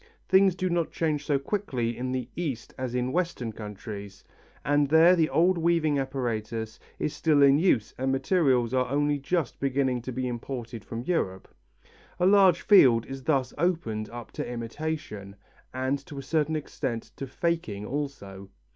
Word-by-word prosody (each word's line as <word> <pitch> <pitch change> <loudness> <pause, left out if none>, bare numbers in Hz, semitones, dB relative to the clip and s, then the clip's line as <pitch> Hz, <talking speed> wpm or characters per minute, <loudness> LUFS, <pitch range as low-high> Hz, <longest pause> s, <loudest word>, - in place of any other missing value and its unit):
Things 190 -1 +5
do 185 0 -1
not 170 -2 0
change 150 -3 -1
so 145 - +3
quickly 135 - -2
in 125 +1 -3
the 130 -2 -2
East 140 -10 -4
as 130 -1 -4
in 125 +1 0
Western 170 -9 -1
countries, 105 -1 -8 0.4
and 145 0 +2
there 165 +4 +7
the 160 -3 +2
old 175 +2 +3
weaving 165 -3 +2
apparatus 115 -4 -3 0.2
is 150 - -2
still 150 -1 +3
in 140 +1 +6
use 155 - +2
and 130 +1 0
materials 135 -5 +2
are 130 -1 +2
only 145 +1 +1
just 155 0 -2
beginning 135 -2 0
to 130 - -6
be 130 +1 -2
imported 120 -2 -6
from 115 +4 -6
Europe. 95 - -1 0.7
A 180 - +3
large 190 -3 +5
field 125 - +6
is 135 0 -7
thus 135 -5 +1
opened 145 -12 -1
up 120 0 -9
to - - -5
imitation, 115 -4 -5 0.4
and 130 +2 -2
to 145 - -9
a 135 - -5
certain 155 +2 0
extent 135 -6 -4
to 135 - -5
faking 135 -9 -2
also. 105 -8 -5
135 Hz, 165 wpm, -27 LUFS, 120-160 Hz, 0.7 s, there